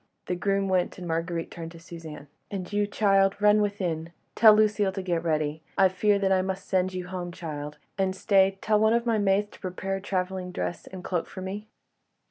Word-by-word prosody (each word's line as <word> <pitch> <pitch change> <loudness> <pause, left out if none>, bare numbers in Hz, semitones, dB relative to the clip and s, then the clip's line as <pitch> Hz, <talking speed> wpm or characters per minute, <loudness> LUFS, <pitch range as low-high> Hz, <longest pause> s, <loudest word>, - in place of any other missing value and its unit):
The 180 - -1
groom 195 +2 0
went, 185 -2 0
and 180 -1 -7
Marguerite 165 0 -2
turned 165 -1 -7
to 165 - -12
Suzanne. 160 -3 -10 0.2
"And 190 -1 -5
you, 205 0 +2
child, 195 -2 +3
run 210 0 +5
within. 175 -6 -2 0.2
Tell 220 -2 +8
Lucile 210 -2 +3
to 190 -1 -4
get 170 -3 -1
ready. 155 -1 0 0.2
I 190 -1 +6
fear 200 +2 +2
I 185 - +3
must 190 0 -4
send 185 0 +1
you 180 -1 -3
home, 180 -1 -4
child. 150 -4 -6 0.2
And—stay, 195 0 +3
tell 215 -1 +2
one 220 +1 +4
of 235 0 +1
the 230 -2 +2
maids 205 +1 +2
to - - -15
prepare 190 +1 -3
a - - -8
travelling 185 -1 -2
dress 175 - -4
and 185 -1 -9
cloak 175 -3 -2
for 185 - -8
me." 200 +3 -5
190 Hz, 200 wpm, -27 LUFS, 175-200 Hz, 0.2 s, Tell